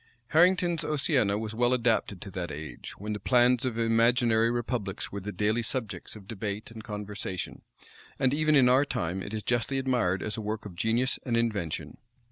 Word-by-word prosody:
Harrington's 175 0 +4
Oceana 140 -9 +1
was 110 0 -4
well 120 +2 +2
adapted 115 -6 +1
to 100 - -8
that 90 -2 -4
age, 75 -4 -7
when 105 +2 -4
the 105 - -4
plans 125 +3 +3
of 120 -3 -2
imaginary 115 0 +3
republics 120 -4 -3
were 100 - -4
the 100 +2 -5
daily 105 +3 +1
subjects 115 -6 -4
of 100 -3 -12
debate 105 0 -4
and 110 -1 -9
conversation; 105 -3 -5 0.6
and 130 0 +2
even 155 +1 +3
in 130 -3 +6
our 130 +3 +5
time, 95 - -2
it 100 - -6
is 110 -1 -4
justly 120 +3 0
admired 125 -9 +1
as 105 +1 -3
a - - -3
work 110 +1 -4
of 100 - -7
genius 115 +7 +1
and 120 -3 0
invention. 105 -9 -2
115 Hz, 185 wpm, -28 LUFS, 105-125 Hz, 0.6 s, in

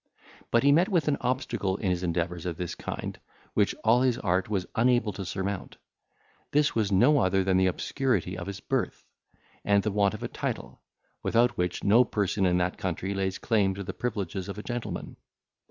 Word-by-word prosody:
But 115 - +3
he 140 - +6
met 170 +7 +4
with 170 -7 +1
an 145 - +2
obstacle 120 -6 -1
in 95 -4 0
his 90 -1 -1
endeavours 85 0 -2
of 85 -2 -3
this 90 -1 -3
kind, - - -6 0.3
which - - +2
all 115 +3 +5
his 125 -2 +2
art 95 -3 0
was 95 -4 -1
unable 120 -2 +2
to 95 - -5
surmount. 95 +1 -4 0.7
This 150 0 +2
was 105 -3 0
no 125 +10 +5
other 95 -2 +2
than 95 -1 +2
the 95 0 +4
obscurity 120 0 -1
of 90 +1 -6
his 100 0 -6
birth, - - -2 0.6
and 100 -1 +3
the 105 - 0
want 100 -1 +2
of - - -8
a - - -1
title, - - -5 0.4
without 120 0 +2
which 90 0 -2
no 115 +5 +6
person 100 -4 0
in 90 0 +2
that 90 0 -1
country 95 +1 -2
lays 95 -1 -1
claim 100 -4 +1
to 100 - -5
the - - -5
privileges 100 -5 -3
of 100 - -5
a 105 - -6
gentleman. 120 -1 -5
100 Hz, 195 wpm, -28 LUFS, 95-120 Hz, 0.7 s, he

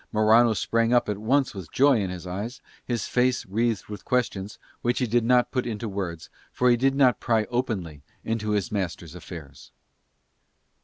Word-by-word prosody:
Morano 110 +2 +4
sprang 115 +4 +1
up 120 - +3
at 105 -1 -2
once 130 +5 +1
with 95 -6 -9
joy 135 -3 +4
in 95 - -2
his 90 -1 -7
eyes, 100 +8 -5 0.2
his 120 -2 -2
face 125 0 +1
wreathed 110 +2 -1
with 105 -1 -8
questions, 110 -6 -1 0.2
which 120 +1 0
he 125 - +1
did 120 0 +1
not 125 +1 +3
put 125 -2 -1
into 115 0 -4
words 95 -5 -5 0.2
for 125 0 +3
he - - +5
did 135 +3 +1
not 130 -3 +4
pry 115 -2 +1
openly 95 - -2 0.2
into 110 -1 -2
his 105 +2 0
master's 90 -5 -3
affairs. 80 -6 -11
110 Hz, 175 wpm, -25 LUFS, 95-125 Hz, 0.2 s, he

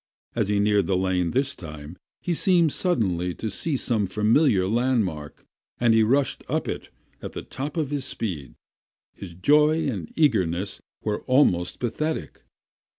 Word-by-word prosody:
As - - 0
he 105 0 +1
neared 100 -3 +2
the 95 - +1
lane 90 -2 0
this 135 +5 0
time 75 - -9 0.3
he 175 - -1
seemed 170 -2 +3
suddenly 90 - 0
to 110 - -4
see 145 - -1
some 110 -6 0
familiar 105 - +3
landmark, 110 - -1 0.3
and 120 -2 +4
he 110 - +5
rushed 130 +5 +1
up - - -1
it - - -5 0.3
at - - -7
the - - -6
top 145 +5 -6
of 150 -3 -1
his 145 -2 -1
speed. 80 - -5 0.6
His 90 -4 -10
joy 150 - +3
and 95 - -4
eagerness 100 - +1 0.2
were 105 -1 -2
almost 90 -10 +2
pathetic. 155 +7 -3
110 Hz, 150 wpm, -25 LUFS, 90-140 Hz, 0.6 s, he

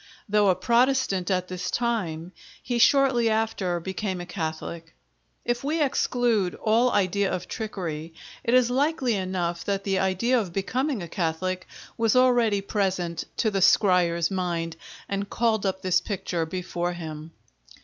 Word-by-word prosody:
Though 210 -1 +3
a 185 - +4
Protestant 235 -1 +2
at 185 -1 0
this 180 -1 -4
time, 185 -9 -2 0.3
he 240 -1 -1
shortly 260 -3 +4
after 220 -5 0
became 190 +1 -3
a 175 - -5
Catholic. 165 -1 -5 0.5
If 240 +1 -1
we 305 +4 0
exclude 245 - +1
all 230 +3 +2
idea 200 0 +1
of 180 0 -3
trickery, 165 -7 -5 0.3
it 235 - +2
is 250 -1 +4
likely 270 -2 +1
enough 185 -3 -2
that 200 -1 -1
the 195 -1 0
idea 190 +7 +2
of 190 -6 -4
becoming 250 - -1
a - - -6
Catholic 185 +2 -2 0.3
was 225 0 +3
already 240 -5 +4
present 185 -4 -1
to 220 - +1
the 195 -1 0
scryer's 180 -3 +4
mind 170 -3 -2 0.3
and 200 0 -3
called 220 -4 +1
up 190 0 -3
this 180 -1 +3
picture 175 -5 -3
before 175 0 -3
him. 160 -1 -8
195 Hz, 150 wpm, -25 LUFS, 175-230 Hz, 0.5 s, a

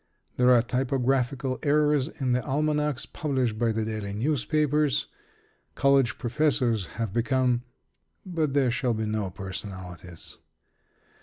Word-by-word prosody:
There 125 0 +4
are 120 -2 +6
typographical 130 +1 0
errors 150 -2 +3
in 135 -6 -2
the 125 +1 +1
almanacs 150 -1 0
published 130 -8 -1
by 120 -1 +2
the 110 0 -1
daily 110 -2 -4
newspapers. 150 +3 +1 0.7
College 135 -3 +3
professors 125 - +1
have 115 -4 -2
become 125 +1 +1 0.6
But 160 -6 -1
there 135 -4 +3
shall 125 -1 0
be 110 0 -2
no 105 -2 -1
personalities. 95 -2 -7
125 Hz, 120 wpm, -27 LUFS, 110-145 Hz, 0.7 s, are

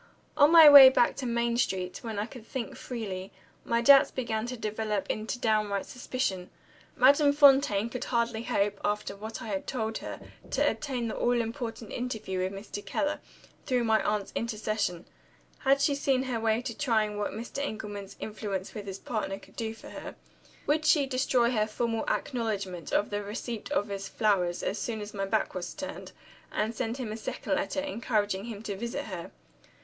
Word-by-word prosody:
On 290 +2 +6
my 330 -2 +10
way 280 -2 +12
back 260 -2 +3
to 260 - -3
Main 235 0 0
Street, 185 -6 -1
when 225 -3 -5
I 205 - 0
could 240 -1 -11
think 255 -4 -5
freely, 195 -6 -5 0.3
my 235 0 +1
doubts 275 +2 +8
began 230 -3 -2
to 250 0 -5
develop 215 -2 -2
into 215 +3 -3
downright 215 -4 0
suspicion. 200 -8 -3 0.5
Madame 285 +3 +5
Fontaine 275 -7 +5
could 240 +1 -5
hardly 235 -2 0
hope, 210 -4 0
after 205 -1 -1
what 220 +2 -7
I 225 - -6
had 195 -2 -3
told 220 -3 -2
her, - - -7 0.3
to - - +2
obtain 255 -5 -2
the 220 - -4
all 245 0 +2
important 225 -1 -4
interview 220 -6 -3
with 185 +1 -1
Mr. 200 +1 -7
Keller, 295 +1 -1 0.5
through 250 -3 +2
my 220 -1 +3
aunt's 210 -1 -1
intercession. 215 -6 -2 0.5
Had 275 +1 +3
she 280 +1 +3
seen 270 -2 +1
her 250 -3 -2
way 225 +1 +1
to 235 -3 -4
trying 220 -6 0
what 205 - -1
Mr. 230 +6 -6
Engelman's 205 -5 -6
influence 205 -3 -4
with 205 -2 -7
his 195 -1 -5
partner 210 -3 -3
could - - -18
do 225 -1 -3
for - - -12
her? - - -8 0.5
Would 305 +2 +1
she 300 -2 +4
destroy 255 -2 +2
her 215 -3 +1
formal 225 +1 -2
acknowledgment 205 -8 -2
of 205 - +1
the 205 0 -1
receipt 220 +4 -5
of 210 -8 0
his 195 -1 -5
flowers, 185 -6 +1
as 205 - -2
soon 225 0 -3
as 210 0 -7
my 195 -1 -2
back 215 +2 0
was 180 -1 -5
turned, 285 -1 -7 0.4
and 220 +2 -1
send 225 +2 -3
him 245 -5 -4
a 215 - -4
second 225 - -3
letter, 295 -1 -1
encouraging 215 -7 -1
him 220 -3 -7
to 205 -3 -4
visit 235 +4 -4
her? 185 -5 -6
225 Hz, 185 wpm, -29 LUFS, 205-250 Hz, 0.5 s, way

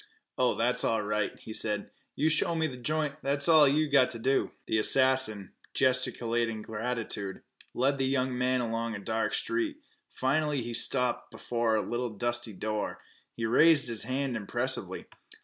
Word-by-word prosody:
"Oh, 125 -1 +2
that's 120 +2 +1
all 110 -2 +1
right," 105 0 -1
he 110 - -9
said. 105 -2 -2 0.2
"You 155 - +1
show 160 +2 +2
me 160 -1 +1
th' 125 -4 -9
joint 150 +1 -1
that's 140 +2 -1
all 155 -3 +7
you've 150 +2 +1
got 130 -3 +5
t' 125 - -6
do." 135 +4 +1 0.2
The 110 - +1
assassin, 130 -5 +3 0.2
gesticulating 120 -4 0
gratitude, 110 -3 -4 0.3
led 135 +2 +1
the 135 - +1
young 130 -1 0
man 125 0 +1
along 115 -1 -2
a - - -5
dark 110 +3 -1
street. 340 -3 -1 0.3
Finally 145 0 0
he 120 0 -5
stopped 125 +1 0
before 115 -2 -1
a 110 - -1
little 120 -3 -3
dusty 120 0 -1
door. 105 +2 -3 0.4
He 115 - -3
raised 150 +6 +5
his 115 -2 -1
hand 130 +1 -2
impressively. 120 +5 -2
125 Hz, 165 wpm, -29 LUFS, 115-135 Hz, 0.4 s, all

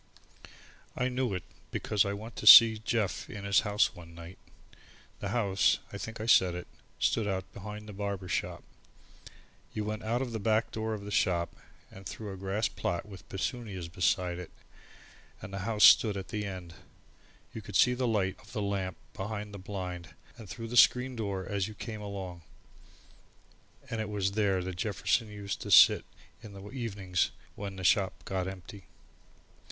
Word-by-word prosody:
I 125 +1 0
knew 125 -5 -1
it 90 - -4 0.3
because 105 -2 +1
I 100 - -1
went 110 +3 -8
in - - -5
to 110 - -3
see 115 -1 +11
Jeff 110 -2 -2
in 100 -2 -7
his 100 0 +4
house 105 0 +1
one 85 -2 -13
night. 85 +2 -11 0.8
The 100 - -4
house, 100 -3 +2 0.2
I 100 - -5
think 110 +1 -6
I 110 - -4
said 95 -6 +5
it, 90 0 -6 0.3
stood 110 -2 +1
out 95 -2 -3
behind 105 +1 -8
the 105 - -8
barber 100 -2 -4
shop. - - -3 1.1
You 105 - -1
went 110 +1 -3
out 115 +3 -1
of 125 - -5
the 110 - -3
back 110 +2 +1
door 110 0 -2
of 100 -1 -8
the 105 - -6
shop, 85 -3 +1 0.4
and 95 - -12
through 105 +1 -6
a - - -7
grass 95 +3 -1
plot 85 +1 -3
with 100 -2 -13
petunias 95 -3 -4
beside 90 +1 0
it, 90 - -8 0.9
and 95 - -9
the 100 - -3
house 105 -2 +2
stood 105 -3 +7
at 95 -1 -6
the 105 -2 -3
end. 90 -4 -7 0.8
You 110 - -6
could 100 -1 -9
see 125 - +5
the 125 0 -1
light 100 -4 0
of - - -16
the 110 - -2
lamp 95 -2 -2 0.2
behind 105 +1 -5
the 100 - -7
blind, 90 -2 -6 0.2
and 110 -5 -12
through 115 +4 -6
the 120 - -4
screen 125 +2 +5
door 100 -4 -3
as 100 -2 -1
you 110 - -9
came 110 0 -6
along. 95 -4 -6 1.5
And 115 -1 -3
it 110 - -4
was 100 -2 -1
here 100 -3 +1
that 90 -1 -5
Jefferson 110 +3 0
used 100 -1 -5
to - - -6
sit - - +7 0.4
in 110 -3 -11
the 100 +1 -10
evenings 100 -8 -1 0.2
when 100 -1 -6
the 95 - -7
shop 95 +1 +2
got 95 -1 -2
empty. 95 +1 -9
100 Hz, 185 wpm, -30 LUFS, 95-110 Hz, 1.5 s, see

